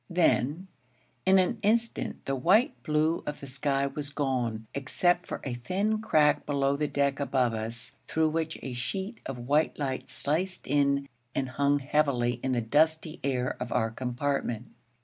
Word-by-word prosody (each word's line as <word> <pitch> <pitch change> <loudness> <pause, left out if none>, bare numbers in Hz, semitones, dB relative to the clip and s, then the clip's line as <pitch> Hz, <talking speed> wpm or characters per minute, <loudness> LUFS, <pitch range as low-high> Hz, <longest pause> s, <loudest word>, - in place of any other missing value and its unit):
Then, 170 -1 +2 0.6
in 190 0 +7
an 190 +5 +2
instant, 230 +3 0
the 135 - 0
white 200 - +4
blue 155 +1 +1
of 150 - -3
the - - -8
sky 140 +1 0
was 145 +1 -3
gone, 125 -6 -1
except 175 +6 +1
for - - -4
a 130 - -3
thin 195 - -1
crack 150 -7 +3
below 140 -1 +2
the 150 +1 0
deck 140 -1 0
above 130 -4 +1
us, 115 +2 -5
through 160 0 +2
which 160 0 -2
a 130 - -4
sheet 190 - -4
of 135 - -4
white 145 +6 +1
light 135 -3 -3
sliced 180 +6 -2
in 140 0 +2 0.3
and 130 -1 -1
hung 140 +2 +2
heavily 135 -4 +1
in 130 -1 0
the 120 - +1
dusty 155 +6 +2
air 130 -2 0
of 125 -1 -4
our 115 -2 +1
compartment. 125 -1 -2
140 Hz, 165 wpm, -29 LUFS, 130-160 Hz, 0.6 s, in